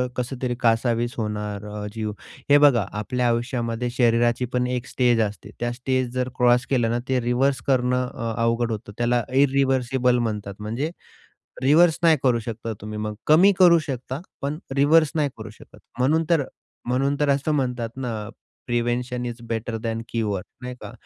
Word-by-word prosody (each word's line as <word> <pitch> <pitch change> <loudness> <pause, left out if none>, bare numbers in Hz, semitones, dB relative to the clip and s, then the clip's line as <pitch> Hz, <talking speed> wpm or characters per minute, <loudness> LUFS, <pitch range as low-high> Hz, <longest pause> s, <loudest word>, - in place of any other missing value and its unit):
कसं 125 +1 -3
तरी 125 -1 -1
कासावीस 120 +1 +1
होणार 105 -2 -3
अ, 105 0 -6
जीव. 110 -1 -3 0.4
हे 145 - +8
बघा 135 -8 +5
आपल्या 125 +3 -1
आयुष्यामध्ये 120 0 -1
शरीराची. 120 0 +3
पण 125 0 -1
एक 125 0 -2
स्टेज 120 -2 +2
असते. 105 -1 -3
त्या 120 0 -1
स्टेज 130 0 -1
जर 130 0 -1
क्रॉस 125 0 +4
केलं 120 -4 +2
ना, 120 - 0
ते 130 -1 +2
रिव्हर्स 125 +2 +1
करणं 125 -1 +2
अ, 115 -3 -4
अवघड 115 0 +1
होतं 105 -1 -5
त्याला 120 0 +1 0.2
इरिव्हर्सिबल 130 -2 +2
म्हणतात 105 -2 -4
म्हणजे 120 +10 -3 0.7
रिव्हर्स 160 +4 +5
नाही 160 -2 +6
करू 125 -3 +3
शकता 115 0 -5
तुम्ही 105 0 -6
मग. 105 0 -3
कमी 175 +7 +7
करू 175 -2 +7
शकता 130 -2 -5 0.2
पण 145 +2 -2 0.2
रिव्हर्स 150 +2 +4
नाही 150 -3 +1
करू 110 -1 -8
शकत. 105 - -16 0.2
म्हणून 155 +6 +3
तर 165 -4 +3 0.4
म्हणून 135 +3 +1
तर 145 - +2
असं 140 +2 +1
म्हणतात 125 -4 -1
ना, 125 -3 -3 0.5
"prevention 120 +1 -1
is 120 -1 -5
better 115 0 -2
than 115 0 -2
cure," 105 -5 -1 0.2
नाही 125 0 -6
का. - - -8
125 Hz, 170 wpm, -23 LUFS, 115-135 Hz, 0.7 s, हे